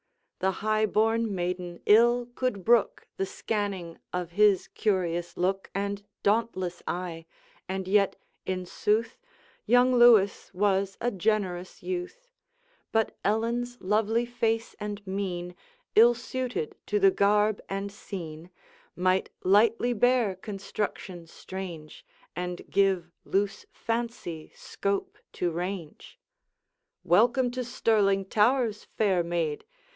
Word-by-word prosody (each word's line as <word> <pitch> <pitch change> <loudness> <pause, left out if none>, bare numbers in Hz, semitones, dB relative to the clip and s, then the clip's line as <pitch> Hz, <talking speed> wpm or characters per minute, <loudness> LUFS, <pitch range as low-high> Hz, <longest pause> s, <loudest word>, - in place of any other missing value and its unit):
The 190 - +2
high 215 0 +2
born 225 0 +1
maiden 180 -1 -3
ill 240 +3 +5
could 245 -7 -2
brook 235 -1 +3
The 195 - 0
scanning 195 -6 -3
of 180 -1 -3
his 205 0 +4
curious 175 -4 -1
look 195 +2 -1
And 200 0 -2 0.2
dauntless 200 -5 0
eye: 170 -2 -4 0.4
and 190 0 -3
yet, 200 0 +3 0.3
in 185 -1 -3
sooth 215 +5 0 0.5
Young 245 +1 +5
Lewis 235 -5 +5
was 195 0 +1
a 245 - 0
generous 190 -3 -1
youth; 370 +7 -5 0.6
But 225 0 +1
Ellen's 235 +4 0
lovely 220 +4 +1
face 230 -2 -1
and 205 -1 -5
mien 180 -2 -4 0.4
Ill 235 +2 +7
suited 255 - -4
to 420 - +1
the 390 -1 +6
garb 210 - +2
and 195 +1 -3
scene, 170 -5 -8 0.5
Might 185 +1 +1
lightly 225 +5 +4
bear 245 -3 +3
construction 195 -3 -5
strange, 170 -4 -8 0.3
And 180 0 -4
give 190 -3 +2
loose 200 +1 -1
fancy 230 -9 -4
scope 200 0 -3
to 175 -1 -1
range. 175 -1 -6 0.8
'Welcome 240 +7 +3
to 255 +1 -3
Stirling 210 -5 +2
towers, 220 +1 +2
fair 195 -5 +3
maid! 170 -3 -2
200 Hz, 115 wpm, -28 LUFS, 185-230 Hz, 0.8 s, Ill